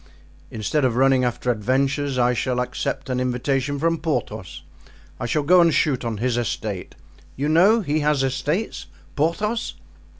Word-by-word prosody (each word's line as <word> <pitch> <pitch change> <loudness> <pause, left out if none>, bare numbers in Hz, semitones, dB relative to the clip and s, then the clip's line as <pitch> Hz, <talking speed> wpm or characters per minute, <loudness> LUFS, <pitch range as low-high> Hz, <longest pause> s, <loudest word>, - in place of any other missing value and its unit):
Instead 115 +7 -1
of 125 -3 +2
running 130 0 +4
after 125 0 0
adventures 135 +4 0
I 125 0 +3
shall 125 +1 -1
accept 130 +2 -3
an 125 -1 -1
invitation 130 +3 -1
from 165 +2 0
Porthos; 145 -9 -3 0.6
I 120 - -3
shall 150 +5 0
go 180 +4 +6
and 170 -1 +4
shoot 145 -4 +1
on 115 -2 -3
his 120 +2 0
estate. 105 -5 -3 0.4
You 140 +2 -2
know 190 +9 +5
he 155 -4 0
has 150 -2 +1
estates—Porthos?" 160 - -2
135 Hz, 145 wpm, -22 LUFS, 125-150 Hz, 0.6 s, go